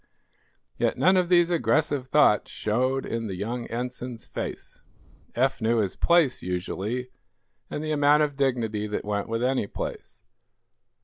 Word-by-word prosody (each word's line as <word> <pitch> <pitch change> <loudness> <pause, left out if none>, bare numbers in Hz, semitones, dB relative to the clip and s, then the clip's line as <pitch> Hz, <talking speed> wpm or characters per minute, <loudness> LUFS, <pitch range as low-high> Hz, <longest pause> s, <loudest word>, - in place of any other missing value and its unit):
Yet - - +1
none 185 - +4
of 180 -2 +2
these 175 -1 +4
aggressive 150 -5 +1
thoughts 130 -7 +4
showed 130 +5 -1
in 115 -1 -3
the 95 - -4
young 115 +5 -4
Ensign's 125 -1 -5
face. - - -7 0.5
Eph 130 +1 +1
knew 115 +1 +2
his 100 -4 0
place, 170 -6 +3
usually, 100 +7 -3 0.6
and 150 - -4
the 155 - -2
amount 150 0 +4
of 145 -2 -2
dignity 115 -6 0
that 105 - -4
went 105 0 -2
with 115 +1 -1
any 130 -4 +1
place. - - -7
125 Hz, 145 wpm, -26 LUFS, 110-145 Hz, 0.6 s, none